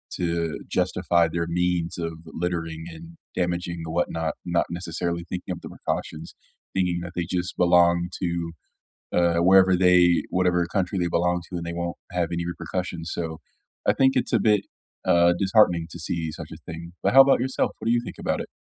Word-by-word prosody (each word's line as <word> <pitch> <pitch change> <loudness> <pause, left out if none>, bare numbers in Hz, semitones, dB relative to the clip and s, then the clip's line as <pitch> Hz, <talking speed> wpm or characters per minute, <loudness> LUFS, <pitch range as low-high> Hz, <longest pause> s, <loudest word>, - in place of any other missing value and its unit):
to 85 -2 -1
justify 90 -2 +2
their 85 0 -2
means 90 0 0
of 85 -1 -3
littering 80 -1 -3
and 85 0 -11 0.2
damaging 85 -1 -2
the - - -6
whatnot, 80 -1 -1
not 85 -1 +1
necessarily 85 0 -3
thinking 90 +1 -5
of 85 - -9
the - - -8
precautions, - - -5 0.4
thinking 90 -2 0
that 90 0 -7
they 85 - 0
just 90 -1 -2
belong 85 0 +4
to, 85 -2 -2 0.6
uh, 85 -1 +2
wherever 95 +2 +6
they 90 -1 +5
whatever 90 -1 +1
country 95 +1 -1
they 85 - +1
belong 90 +1 +1
to, 90 - -5
and 85 - -4
they 85 - -4
won't 85 0 -3 0.2
have 90 -2 0
any 85 0 -2
repercussions, 85 -1 -4
so 80 -2 -4 0.5
I - - +5
think 135 0 +3
it's 125 - 0
a - - +5
bit, 105 -2 +3 0.4
uh, 85 0 +5
disheartening 95 -5 +3
to 85 - -8
see 80 0 -3
such - - -8
a - - -7
thing. 85 +1 -9
But - - +1
how 135 - +11
about 135 -2 +3
yourself? 130 +1 0
What - - -8
do 115 - +3
you 120 0 +2
think - - -8
about - - -1
it? - - -11
85 Hz, 190 wpm, -25 LUFS, 85-90 Hz, 0.6 s, how